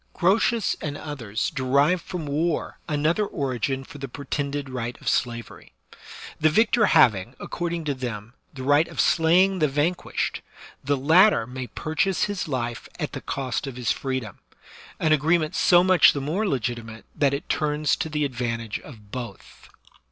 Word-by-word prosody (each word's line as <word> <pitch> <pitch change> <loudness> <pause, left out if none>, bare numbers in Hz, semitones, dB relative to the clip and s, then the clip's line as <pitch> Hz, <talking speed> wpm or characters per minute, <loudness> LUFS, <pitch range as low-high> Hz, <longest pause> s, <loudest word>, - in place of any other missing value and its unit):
Grotius 210 +4 +2
and 145 -1 -4
others 115 -8 -4
derive 140 +5 +2
from 175 -2 -6
war 155 +3 -1
another 155 +7 +1
origin 135 - -2
for 145 - -12
the 135 - -5
pretended 140 +1 -4
right 125 -2 -5
of - - -12
slavery. 120 -1 -2 0.7
The 155 - +4
victor 220 +5 +3
having, 120 -6 +4
accord 175 -1 -4
ing 170 -1 -3
to 145 -2 -1
them, 120 -4 -6 0.2
the 130 -2 -8
right 145 +4 +4
of - - -10
slaying 180 +4 +4
the 155 - +3
vanquished, 150 +6 -1 0.4
the 140 +1 +1
latter 160 - +5
may 125 +1 -6
purchase 160 +8 -1
his 205 -4 -2
life 120 -5 -3
at - - -3
the - - -6
cost 135 0 -3
of 135 - -6
his 125 -2 -1
freedom; 130 -7 -4 0.6
an 160 - +1
agreement 155 +2 +2
so 175 -1 +5
much 185 -3 +6
the 145 - -3
more 165 +10 -1
legitimate 120 - -3
that 140 -1 +2
it 145 - -7
turns 150 -1 +1
to 160 - -3
the 150 -1 0
advantage 115 -4 -3
of 105 -7 -14
both. 120 -6 -9
145 Hz, 160 wpm, -24 LUFS, 125-165 Hz, 0.7 s, much